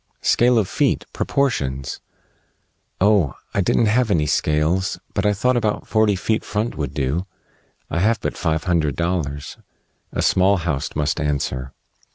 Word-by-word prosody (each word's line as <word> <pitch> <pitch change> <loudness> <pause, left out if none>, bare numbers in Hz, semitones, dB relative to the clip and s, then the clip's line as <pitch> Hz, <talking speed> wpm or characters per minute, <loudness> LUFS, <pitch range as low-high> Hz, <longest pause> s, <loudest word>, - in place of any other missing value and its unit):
"Scale 120 0 +4
of 105 -4 +2
feet. - - 0
Proportions." 70 - -1 1.0
"Oh! 100 -8 +3 0.2
I 100 - +2
didn't 105 +5 +2
have 115 +2 +2
any 80 -6 +2
scales, 80 +7 +1 0.2
but - - +1
I 105 - +3
thought 125 +6 +1
about 110 -3 0
forty 110 -2 +3
feet 110 +4 -1
front 105 +3 -2
would 70 -2 -4
do. 75 +7 -1 0.6
I 85 - -2
have 110 +4 +2
but - - -3
five 80 -2 -1
hundred 80 -6 +1
dollars. 80 -5 -3 0.5
A - - -1
small 95 +2 +4
house 80 -5 -3
must 75 +2 0
answer." 70 -3 -2
90 Hz, 150 wpm, -21 LUFS, 75-105 Hz, 1.0 s, Scale